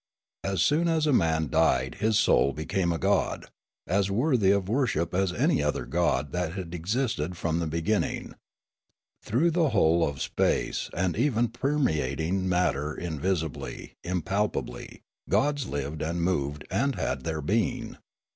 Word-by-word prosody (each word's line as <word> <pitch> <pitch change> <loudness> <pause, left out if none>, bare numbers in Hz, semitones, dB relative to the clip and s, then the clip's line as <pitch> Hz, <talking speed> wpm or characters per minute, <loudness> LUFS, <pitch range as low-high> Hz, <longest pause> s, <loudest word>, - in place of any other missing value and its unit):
As 95 -4 +1
soon 160 +4 +2
as 160 -2 +2
a 150 - +3
man 80 -7 +2
died 75 -5 +2
his 110 0 +2
soul 70 - +4
became 85 +4 -1
a 85 - -1
god, 75 - 0 0.4
as 100 +2 +1
worthy 115 -1 +2
of 100 -2 +2
worship 110 - 0
as 95 0 +1
any - - +2
other - - -1
god 75 -5 0
that 90 -2 -2
had 90 -3 -6
existed 90 - -2
from 85 -1 -1
the 85 - -1
beginning. 85 +7 -1 0.9
Through 150 +10 +1
the 165 -2 +2
whole 85 -6 +3
of 70 -3 -2
space, - - 0
and 90 0 0
even 120 -1 +1
permeating 95 - 0
matter 75 -5 0
in 80 -4 -4
visibly, 80 -5 -3
impalpably, 95 +4 -2 0.3
gods 145 -2 +1
lived 70 +2 -4
and 85 +2 -1
moved 75 -5 -1
and 140 +1 +1
had 65 -1 -2
their 80 +1 -2
being. 115 - -1
90 Hz, 145 wpm, -27 LUFS, 80-115 Hz, 0.9 s, soul